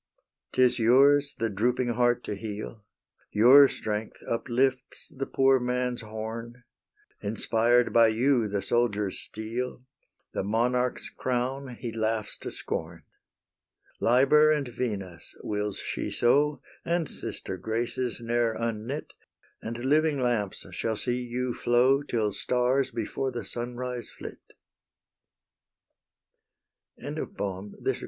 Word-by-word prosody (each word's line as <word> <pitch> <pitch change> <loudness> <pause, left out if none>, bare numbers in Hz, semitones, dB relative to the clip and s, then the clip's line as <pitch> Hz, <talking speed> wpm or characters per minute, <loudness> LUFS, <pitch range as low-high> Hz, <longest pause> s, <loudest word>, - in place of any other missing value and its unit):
'Tis 130 -1 +4
yours 140 +5 +5
the 115 - 0
drooping 120 +4 0
heart 120 +1 +2
to - - -4
heal; 105 +1 -6 0.5
Your 130 +6 +8
strength 105 0 -4
uplifts 130 +2 -1
the 135 0 -3
poor 135 0 +4
man's 125 0 -1
horn; 115 +2 -7 0.6
Inspired 115 +3 +2
by 115 -1 +7
you, 120 +1 +2
the 100 -1 -2
soldier's 105 -3 0
steel, 120 +3 -5 0.5
The - - -1
monarch's 125 +4 0
crown, 130 +1 -3
he 120 0 -5
laughs 110 -1 -2
to - - -5
scorn. - - -5 1.0
Liber 140 +6 +5
and 150 -3 0
Venus, 100 -8 -5
wills 105 -1 -2
she - - -4
so, 145 +3 +2 0.2
And 170 -2 0
sister - - -2
Graces, 115 +5 -2
ne'er 120 -1 +1
unknit, 115 +5 -4 0.5
And 115 +2 -5
living 150 +1 +3
lamps 120 -6 -1
shall 110 -1 -2
see 125 +2 -1
you 125 +1 -2
flow 125 +4 +3
Till 115 -7 -1
stars 125 +5 +1
before 120 +4 -3
the 120 -4 -5
sunrise 120 +2 -5
flit. - - -9 2.6
XXII. - - -5
MONTIUM 100 0 -4
CUSTOS. - - 0
120 Hz, 115 wpm, -27 LUFS, 110-130 Hz, 2.6 s, Your